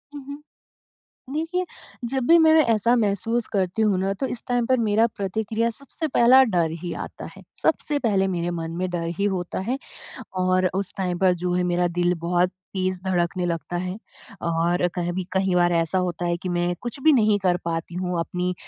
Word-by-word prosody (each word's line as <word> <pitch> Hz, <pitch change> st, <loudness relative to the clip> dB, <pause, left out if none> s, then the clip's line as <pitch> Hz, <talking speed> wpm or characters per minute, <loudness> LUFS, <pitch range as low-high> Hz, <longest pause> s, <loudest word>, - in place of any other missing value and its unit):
उहुँ। 285 Hz, +1 st, -8 dB, 0.9 s
देखिए, 330 Hz, +5 st, -1 dB, 0.5 s
जब 265 Hz, -2 st, -1 dB
भी 335 Hz, -, +7 dB
मैं 320 Hz, -1 st, +6 dB, 0.2 s
ऐसा 230 Hz, +3 st, +2 dB
महसूस 225 Hz, +2 st, 0 dB
करती 190 Hz, +2 st, 0 dB
हूँ 205 Hz, -4 st, +2 dB
ना 195 Hz, +1 st, 0 dB
तो 270 Hz, -, +1 dB
इस 245 Hz, -, -6 dB
टाइम 245 Hz, -1 st, +1 dB
पर 260 Hz, -, +3 dB
मेरा 220 Hz, +2 st, +3 dB
प्रतिक्रिया 220 Hz, +3 st, -1 dB
सबसे 280 Hz, +6 st, -6 dB
पहला 260 Hz, 0 st, +6 dB
डर 175 Hz, -8 st, +1 dB
ही 175 Hz, -2 st, -4 dB
आता -, -, -8 dB
है। -, -, -12 dB, 0.2 s
सबसे 300 Hz, -2 st, +1 dB
पहले 200 Hz, -7 st, +1 dB
मेरे 170 Hz, 0 st, -1 dB
मन 165 Hz, -1 st, -4 dB
में 185 Hz, +1 st, -1 dB
डर 170 Hz, -1 st, -2 dB
ही 200 Hz, -, +1 dB
होता 175 Hz, -1 st, -3 dB
है 260 Hz, -, 0 dB, 0.6 s
और 185 Hz, 0 st, +2 dB
उस 195 Hz, -1 st, -2 dB
टाइम 180 Hz, -2 st, -2 dB
पर 185 Hz, -1 st, +4 dB
जो 180 Hz, -, 0 dB
है 180 Hz, -, +1 dB
मेरा 175 Hz, 0 st, +2 dB
दिल 175 Hz, 0 st, +3 dB
बहुत 175 Hz, +1 st, +1 dB, 0.2 s
तेज़ 185 Hz, -1 st, -1 dB
धड़कने 180 Hz, 0 st, 0 dB
लगता 170 Hz, 0 st, -3 dB
है 180 Hz, +2 st, -3 dB, 0.5 s
और 170 Hz, +2 st, +1 dB
कहीं 175 Hz, -1 st, -2 dB
भी 185 Hz, 0 st, -3 dB
कई 190 Hz, -1 st, +1 dB
बार 175 Hz, 0 st, +3 dB
ऐसा 165 Hz, +2 st, +1 dB
होता 175 Hz, -1 st, -2 dB
है 170 Hz, 0 st, 0 dB
कि 185 Hz, -, -3 dB
मैं 175 Hz, 0 st, 0 dB
कुछ 240 Hz, +3 st, -5 dB
भी 315 Hz, +1 st, +6 dB
नहीं 215 Hz, -5 st, +4 dB
कर 185 Hz, -2 st, +2 dB
पाती 165 Hz, 0 st, -3 dB
हूँ। 180 Hz, -1 st, -2 dB
अपनी 180 Hz, +2 st, -2 dB
185 Hz, 195 wpm, -24 LUFS, 175-230 Hz, 0.9 s, भी